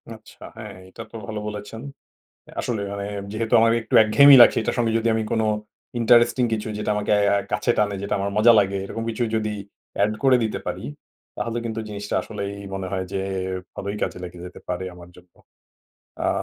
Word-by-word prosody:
আচ্ছা, 110 - -16
হ্যাঁ, 105 -2 -8
এটা 115 +5 -9
তো - - -12
ভালো 110 -1 -4
বলেছেন। 105 +1 -7 0.7
অ্যা - - -15
আসলে, 115 -4 -2
মানে, 100 0 -4 0.3
যেহেতু 110 +1 -1
আমার 115 0 +4
একটু - - -6
একঘেয়েমি 140 +6 +8
লাগছে, - - +6
এটার 115 - -2
সঙ্গে 115 -2 +1
যদি 115 +1 0
আমি 110 - 0
কোন 110 - +1 0.6
ইন্টারেস্টিং 120 +2 +4
কিছু, 110 0 -2
যেটা 105 - -2
আমাকে 105 0 -1 0.2
আ - - +3 0.2
কাছে 105 +3 +1
টানে, 105 -1 +1
যেটা 100 - -2
আমার 100 +1 -2
মজা 115 +3 +7
লাগে, 100 -1 +1
এরকম 115 - -5
কিছু 115 +2 -3
যদি 110 -1 -1 0.5
add 105 - 0
করে 130 -1 +6
দিতে 110 - -2
পারি, - - -4 0.5
তাহলে 115 0 -3
কিন্তু 115 -1 -3
জিনিসটা 105 -1 -5
আসলেই 100 -2 -5 0.2
মনে 95 -1 -4
হয় 95 -1 -1
যে, 95 - -1 0.5
ভালোই 100 +1 -4
কাজে - - -2
লেগে 90 0 -9
যেতে 90 - -12
পারে 90 +1 -3
আমার 90 0 -13
জন্য। 90 0 -19 0.9
আ - - +3
105 Hz, 190 wpm, -23 LUFS, 100-115 Hz, 0.9 s, একঘেয়েমি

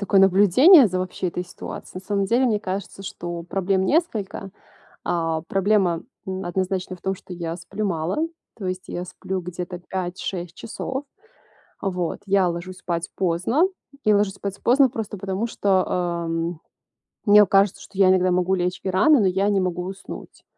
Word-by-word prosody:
такое 200 -1 +3
наблюдение 205 - +7
за, 185 0 -2
вообще, 185 0 -2
этой 180 +1 -4
ситуацией. 180 +1 -8
На - - -23
самом 200 -1 +1
деле, 240 +6 +3
мне 215 -4 +1
кажется, 195 0 -5
что 175 -2 -5
проблем 190 +2 0
несколько. 210 - -1 0.5
А, 165 -2 0
проблема, 195 -3 +2 0.2
м, 190 0 -4
однозначно, 185 +1 -2
в 180 - -20
том, 190 0 -1
что 185 -1 -11
я 170 -1 -4
сплю 195 +5 -4
мало. 170 -2 -1 0.4
То 205 - -7
есть, 185 0 -3
я 175 - -4
сплю 185 +1 -5
где-то 180 0 -6
5-6 180 -1 -4
часов. 265 +4 -5 0.8
А 195 - -1
вот, 180 -3 -3
я 195 -2 +3
ложусь 175 +2 -4
спать 170 -2 -3
поздно 185 - +1 0.4
и 215 - +4
ложусь 205 -1 +2
спать 200 -1 -5
поздно 265 +2 +5
просто 220 -3 -5
потому, 195 +3 -2
что, 195 -4 +2
ам, 170 -2 -2 0.7
мне 210 -1 +8
у - - 0
кажется, 195 -1 +3
что 195 - -13
я 195 -1 +6
иногда 185 0 +4
могу 180 +1 +2
лечь 180 0 -1
и 190 - -1
рано, 245 +11 +5
но 195 - +3
я 190 +2 +1
не 200 -2 +2
могу 180 -1 -1
уснуть. 190 +1 -9
190 Hz, 175 wpm, -23 LUFS, 180-200 Hz, 0.8 s, мне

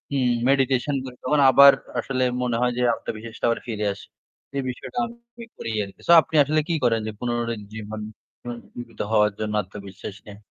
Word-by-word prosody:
উম 125 -2 +2 0.2
meditation 135 +1 +2
করি 125 -1 -8
তখন 150 +3 +2
আবার 140 +1 +9 0.3
আসলে 130 +1 -1 0.2
মনে 120 -2 0
হয় 125 0 +2
যে 125 - 0
আত্মবিশ্বাসটা 110 +1 -6
আবার 115 - 0
ফিরে 105 -2 -1
আসে। - - -13 0.5
এই 135 - -1
বিষয়টা 130 - -5
আমি 235 0 -13
করি - - -5
আরকি। 100 -1 -11
So - - +5
আপনি 160 - -8
আসলে 155 +2 +1
কি 170 - +1
করেন 115 -2 +3
যে - - -2
পুনরাজ্জীবন 110 -3 -4 0.4
পুনরুজ্জিবীত 120 -1 -9
হওয়ার 105 -1 +4
জন্য 105 0 -2
আত্মবিশ্বাস 100 +1 -9
নিয়ে? 100 -1 -11
120 Hz, 170 wpm, -24 LUFS, 110-135 Hz, 0.5 s, আবার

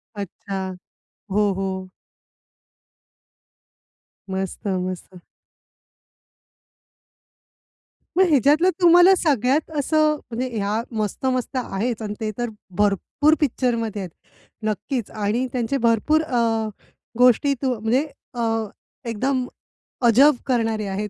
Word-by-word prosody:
अच्छा. 190 -1 -5 0.6
हो, 205 +1 +2
हो. 190 -1 -4 2.4
मस्त! 190 +2 -4
मस्त! 185 -1 -4 3.0
मग 380 - +7
ह्याच्यातलं 295 +5 +4
तुम्हाला 350 +2 +7
सगळ्यात 285 -1 +1
असं 305 +1 +2 0.2
म्हणजे 245 +3 -2
ह्या 210 +2 0 0.2
मस्त-मस्त 255 +5 -1
आहेच 235 -1 -2
आणि 210 -1 -4
ते 215 -1 -1
तर 240 -1 -2 0.3
भरपूर 210 - +2
पिक्चरमध्ये 230 -6 0
आहेत. 185 - -6 0.6
नक्कीच 215 +3 -2
आणि 215 +4 -1
त्यांचे 250 +2 -1
भरपूर 235 +6 +2
अ, 230 -6 0 0.5
गोष्टीतून 250 0 +3
म्हणजे 250 +6 +2 0.3
अ, 240 - -4 0.7
एकदम, 255 +3 -1 0.6
अजब 265 +6 +6
करणारे 225 -4 0
आहेत 200 +2 -3
230 Hz, 90 wpm, -22 LUFS, 205-270 Hz, 3.0 s, मग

